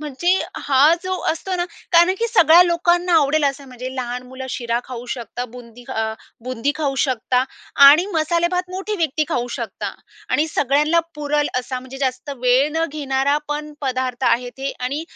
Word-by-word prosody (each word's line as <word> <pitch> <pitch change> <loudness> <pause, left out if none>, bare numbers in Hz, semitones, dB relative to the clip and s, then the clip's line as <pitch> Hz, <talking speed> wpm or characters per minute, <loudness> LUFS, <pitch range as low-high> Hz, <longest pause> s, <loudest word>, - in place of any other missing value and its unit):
म्हणजे 300 +3 -4 0.4
हा 285 +4 +5
जो 370 0 -3 0.2
असतो 365 +4 -3
ना 350 - 0 0.3
कारण 345 +2 +6
की 465 - +1
सगळ्या 345 -6 +7
लोकांना 345 0 +1
आवडेल 295 +1 +2
असं. 280 0 -1
म्हणजे 250 0 -7
लहान 250 -1 -4
मुलं 260 +1 -8
शिरा 235 -1 -1
खाऊ 245 -1 -8
शकतात, 245 0 -6
बुंदी 245 -1 -12
अ, 220 - -2 0.4
बुंदी 255 +2 -1
खाऊ 285 -3 -1
शकतात 255 0 0 0.4
आणि 305 +6 +8
मसालेभात 345 +3 0
मोठी 385 +3 -4
व्यक्ती 310 -3 0
खाऊ 245 0 -1
शकतात 230 -5 -5 0.3
आणि 300 - +2
सगळ्यांना 295 +4 +2
पुरेल 295 0 0
असा 255 +1 -4
म्हणजे 260 +1 -10
जास्त 260 +1 -2
वेळ 255 +4 +4
न 325 +1 +1
घेणारा 280 -1 0
पण 300 0 -4
पदार्थ 255 -1 -2
आहे 245 +1 +2
ते 270 +1 -2
आणि 275 +5 -2
280 Hz, 165 wpm, -20 LUFS, 255-320 Hz, 0.4 s, आणि